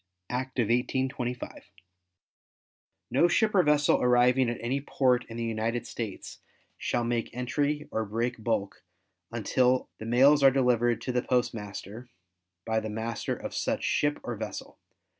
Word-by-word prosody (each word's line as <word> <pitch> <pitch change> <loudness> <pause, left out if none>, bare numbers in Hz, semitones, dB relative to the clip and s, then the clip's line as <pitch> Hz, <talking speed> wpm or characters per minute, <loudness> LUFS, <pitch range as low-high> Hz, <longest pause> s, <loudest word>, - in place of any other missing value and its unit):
Act 130 +2 -3
of 120 - +3
1825. 125 0 -2 1.4
No 170 - +4
ship 215 +5 +2
or 190 - +6
vessel 150 -2 +3
arriving 125 +1 +4
at 120 - -3
any 130 +4 -1
port 125 -3 +1
in 115 - -7
the 115 - -2
United 115 +1 -2
States 110 -6 -6 0.4
shall 120 - -1
make 120 -1 -1
entry 145 +4 -1
or 110 - -1
break 115 +2 -3
bulk 100 -4 -1 0.5
until 125 +3 +1
the 110 - -6
mails 135 +5 +5
are 135 - +8
delivered 120 -3 +2
to 125 - -3
the 125 0 +1
postmaster 115 -2 -3 0.6
by 110 0 +1
the 110 0 -5
master 110 +1 -3
of - - -7
such - - -1
ship 145 0 +1
or 120 - -4
vessel. 105 -1 -7
120 Hz, 145 wpm, -28 LUFS, 115-130 Hz, 1.4 s, are